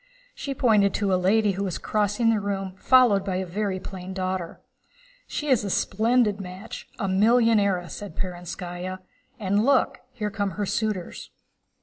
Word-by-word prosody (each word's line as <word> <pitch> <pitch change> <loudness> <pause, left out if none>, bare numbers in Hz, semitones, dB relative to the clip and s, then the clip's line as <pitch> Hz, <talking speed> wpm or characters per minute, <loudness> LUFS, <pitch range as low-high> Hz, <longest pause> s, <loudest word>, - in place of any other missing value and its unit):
She 275 -1 -5
pointed 210 -6 +3
to 200 -2 +1
a - - +5
lady 200 +3 +3
who 195 +1 -3
was 185 -4 -2
crossing 210 +2 +1
the 220 - +2
room 195 -2 -3
followed 245 -7 +5
by 195 -2 -2
a 190 +1 -1
very 190 +1 -2
plain 185 0 -7
daughter. 185 -2 -3 0.7
"She 300 - -4
is 255 -6 +3
a 200 - -3
splendid 215 +1 +2
match, 185 +4 -8
a 195 - -2
millionairess," 205 -3 +3
said 205 -6 -8
Perónskaya. 180 +1 -5 0.4
"And 200 0 +1
look, 270 +1 +2
here 215 -5 -4
come 200 0 -1
her 205 - 0
suitors." 210 -3 -3
200 Hz, 155 wpm, -25 LUFS, 185-220 Hz, 0.7 s, a